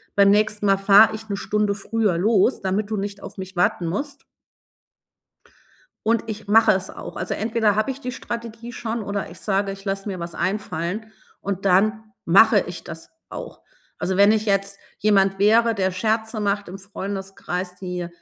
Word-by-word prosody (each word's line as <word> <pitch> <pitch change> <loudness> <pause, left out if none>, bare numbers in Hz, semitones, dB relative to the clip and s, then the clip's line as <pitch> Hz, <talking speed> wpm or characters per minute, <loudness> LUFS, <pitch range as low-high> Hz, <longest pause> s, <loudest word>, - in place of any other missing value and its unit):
beim 200 0 +6
nächsten 210 0 +1
Mal 195 -1 +4
fahre 205 +3 +6
ich 220 0 -10
'ne 200 - -2
Stunde 210 -1 0
früher 210 -3 0
los, 215 +5 +2
damit 195 +2 -1
du 215 - -2
nicht 200 0 -4
auf - - -10
mich 190 0 -8
warten 175 0 +1
musst.“ 280 - -4 1.8
Und 230 0 +2
ich 215 -1 -6
mache 220 +1 +6
es 190 -1 -1
auch, - - -9
also, - - -2
entweder 220 -1 +1
habe 215 +6 +1
ich 265 - -8
die 250 -3 -4
Strategie 235 0 -7
schon 235 -1 -4
oder 200 0 -3
ich - - -12
sage: 195 -1 0
„Ich 195 +1 -10
lasse 195 +1 -3
mir 190 -3 -4
was 170 0 -6
einfallen“, 200 +2 -3 0.3
und 195 -1 -4
dann 215 +3 +2
mache 210 +5 +6
ich 175 0 -7
das 165 -1 -9 0.2
auch. - - -8 0.4
Also, 190 +1 -2
wenn 200 +1 +6
ich 215 0 +1
jetzt 195 -1 0 0.2
jemand 195 -2 +3
wäre, 225 +3 +4
der 190 -2 0
Scherze 220 +3 -1
macht 205 -1 -1
im 190 - -7
Freundeskreis, 195 -2 -5
die 180 -1 -5
200 Hz, 180 wpm, -22 LUFS, 195-220 Hz, 1.8 s, beim